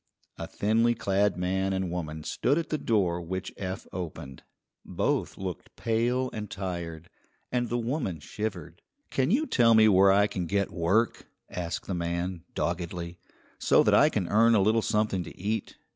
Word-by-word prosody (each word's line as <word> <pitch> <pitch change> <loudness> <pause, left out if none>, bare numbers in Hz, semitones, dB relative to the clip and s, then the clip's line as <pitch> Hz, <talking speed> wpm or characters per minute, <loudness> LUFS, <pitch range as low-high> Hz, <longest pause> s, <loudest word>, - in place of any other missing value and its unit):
A - - -4
thinly 115 +3 +2
clad 100 -3 +1
man 95 +2 0
and 95 -2 -2
woman 80 -3 -4
stood 140 - 0
at 170 - -2
the 155 - -1
door 90 -8 +1
which 95 +2 -5
Eph 95 -1 -5
opened. 80 -7 -6 0.4
Both - - -1
looked 95 -3 -6
pale 120 +3 0
and 105 -2 -5
tired, 85 -4 -5 0.4
and 120 -2 0
the 120 - 0
woman 120 - -2
shivered. 90 -1 -5 0.3
"Can 130 +1 +1
you 270 - +2
tell 115 - +4
me 110 0 +7
where 95 -1 +6
I 100 +1 +5
can 95 -4 -3
get 100 +2 0
work," 95 +7 +1 0.2
asked 85 -2 -4
the 95 - -3
man, 85 0 -3
doggedly, 85 0 -3 0.4
"so - - +4
that - - +3
I - - +6
can 90 - -1
earn 115 +2 +5
a 105 - +4
little 110 +3 +3
something 105 -4 0
to - - -12
eat? 105 +4 -2
95 Hz, 170 wpm, -28 LUFS, 85-110 Hz, 0.4 s, me